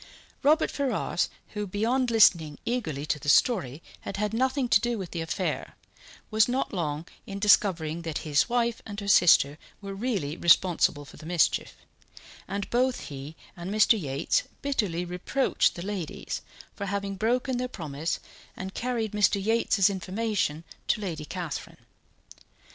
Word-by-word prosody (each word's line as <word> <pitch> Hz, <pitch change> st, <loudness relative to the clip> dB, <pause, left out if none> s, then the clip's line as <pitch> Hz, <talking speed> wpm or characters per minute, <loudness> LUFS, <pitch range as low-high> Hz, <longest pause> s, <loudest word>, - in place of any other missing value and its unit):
Robert 305 Hz, +3 st, +3 dB
Ferrars, 280 Hz, -2 st, -1 dB, 0.2 s
who, 210 Hz, -1 st, -4 dB
beyond 235 Hz, +6 st, +1 dB
listening 170 Hz, -10 st, +4 dB
eagerly 165 Hz, -, -2 dB
to 150 Hz, -, -1 dB
the 145 Hz, -, -3 dB
story, 150 Hz, -, +3 dB, 0.2 s
had 195 Hz, -, -6 dB
had 210 Hz, +1 st, -1 dB
nothing 260 Hz, +2 st, +1 dB
to 235 Hz, -, +5 dB
do 240 Hz, 0 st, -1 dB
with 190 Hz, -4 st, -6 dB
the 170 Hz, -, -3 dB
affair, 160 Hz, -, -3 dB, 0.6 s
was 215 Hz, 0 st, +4 dB
not 255 Hz, 0 st, -1 dB
long 155 Hz, -3 st, -2 dB, 0.2 s
in 195 Hz, -, -5 dB
discovering 175 Hz, -5 st, +3 dB
that 165 Hz, -3 st, -3 dB
his 150 Hz, +7 st, +2 dB
wife 235 Hz, -1 st, 0 dB
and 205 Hz, -1 st, -7 dB
her 200 Hz, -, -6 dB
sister 160 Hz, -6 st, +5 dB, 0.2 s
were 200 Hz, -1 st, -7 dB
really 195 Hz, -, -2 dB
responsible 170 Hz, -2 st, +3 dB
for -, -, -14 dB
the 155 Hz, -, -12 dB
mischief; 175 Hz, -2 st, +1 dB, 0.7 s
and 200 Hz, 0 st, -3 dB
both 250 Hz, +1 st, +2 dB
he 140 Hz, +2 st, -8 dB, 0.2 s
and 175 Hz, 0 st, -6 dB
Mr. 215 Hz, +1 st, +4 dB
Yates 140 Hz, -, 0 dB, 0.2 s
bitterly 205 Hz, -11 st, 0 dB
reproached 180 Hz, +10 st, 0 dB
the 175 Hz, -, -6 dB
ladies 195 Hz, -5 st, -4 dB, 0.3 s
for 200 Hz, -, -4 dB
having 200 Hz, 0 st, -2 dB
broken 245 Hz, +5 st, 0 dB
their 250 Hz, -, -1 dB
promise 160 Hz, -, -4 dB, 0.4 s
and 190 Hz, +1 st, -6 dB
carried 235 Hz, -3 st, -2 dB
Mr. 210 Hz, -1 st, +3 dB
Yates's 220 Hz, -2 st, +3 dB
information 195 Hz, -4 st, -1 dB, 0.2 s
to -, -, +2 dB
Lady 170 Hz, -7 st, -4 dB
Catherine. 175 Hz, -1 st, -5 dB
195 Hz, 150 wpm, -27 LUFS, 165-230 Hz, 0.7 s, to